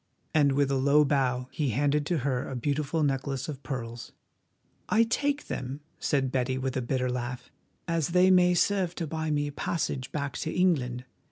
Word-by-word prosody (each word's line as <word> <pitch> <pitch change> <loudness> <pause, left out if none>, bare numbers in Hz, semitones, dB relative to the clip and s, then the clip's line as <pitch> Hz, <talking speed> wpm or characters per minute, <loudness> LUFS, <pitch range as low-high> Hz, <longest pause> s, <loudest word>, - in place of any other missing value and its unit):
And 145 -3 +4
with 140 0 +2
a 135 - +2
low 140 +3 +4
bow 130 -3 +1
he 145 -4 -1
handed 145 +4 +1
to 175 - +1
her 130 -3 -1
a 135 - -4
beautiful 145 +5 -1
necklace 135 -1 -1
of 145 -3 -6
pearls. 120 -4 -6 0.8
"I 225 +2 +5
take 285 +5 0
them," 135 +3 -5 0.2
said 135 -3 0
Betty, 130 0 0
with 130 -1 -2
a 130 - 0
bitter 125 +1 -1
laugh, 125 0 -5 0.4
"as 165 -3 +1
they 180 +2 +4
may 180 -1 +5
serve 185 -1 +1
to 170 - -3
buy 160 0 -3
me 145 -1 +1
a 145 - -4
passage 140 -4 -2
back 140 -2 -3
to 160 - -2
England. 130 -9 +1
140 Hz, 185 wpm, -28 LUFS, 130-160 Hz, 0.8 s, I